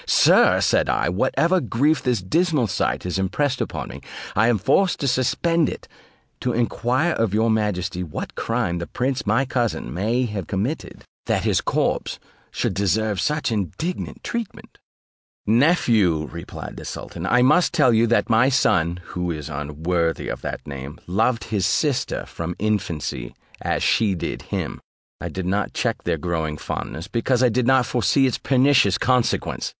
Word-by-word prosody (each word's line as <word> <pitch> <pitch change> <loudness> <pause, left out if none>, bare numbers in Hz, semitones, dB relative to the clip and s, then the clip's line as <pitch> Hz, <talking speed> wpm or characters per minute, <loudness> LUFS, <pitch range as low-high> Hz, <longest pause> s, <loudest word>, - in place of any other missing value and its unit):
"Sir," - - +5
said - - +2
I, - - +1
"whatever 165 - +1
grief 140 +6 +1
this 120 -7 0
dismal 155 - +1
sight 100 - -1
has 90 +1 -2
impressed 130 +8 0
upon - - -4
me, - - -9 0.3
I 110 +3 +4
am 120 -2 +3
forced 185 - +2
to 140 - 0
suspend 150 +6 +1
it, - - -8 0.5
to 125 - -1
enquire 125 +6 +1
of 110 -3 0
your 110 +1 +3
majesty 100 -5 -1
what 80 -4 -5
crime 85 0 -1
the 85 - -5
prince 130 0 -2
my 115 +6 +2
cousin 120 - -2
may 115 +8 0
have 105 -6 -5
committed, 110 +10 -3 0.2
that - - +1
his - - +2
corpse - - -1 0.3
should - - -2
deserve 100 +1 0
such 150 -4 0
indignant 105 - -3
treatment?" 235 -3 -6 0.7
"Nephew," 110 - +3
replied 85 0 -8
the - - -8
sultan, - - -6
"I 125 0 +4
must 175 +8 +4
tell 145 -8 +4
you, 115 +1 +4
that 120 - +2
my 115 +2 +4
son 90 -9 +2
(who 90 0 -3
is 75 -3 -4
unworthy 80 +3 -2
of - - -5
that - - -5
name) 70 +2 -7
loved 110 +6 +1
his 100 -4 0
sister 140 +5 0
from 85 +1 -5
his 105 - -1
infancy, 85 - -2 0.3
as - - -1
she 105 -4 +2
did 85 - -4
him: - - -4 0.4
I - - -4
did 95 -1 -5
not 100 +2 -1
check - - -1
their - - 0
growing 80 -3 -2
fondness, 80 +3 -5
because 120 +3 +1
I 125 - +5
did 120 +1 0
not 130 -2 +4
foresee 125 +4 +2
its 130 - 0
pernicious 130 -7 +3
consequence. 125 -2 0
110 Hz, 165 wpm, -22 LUFS, 90-130 Hz, 0.7 s, Sir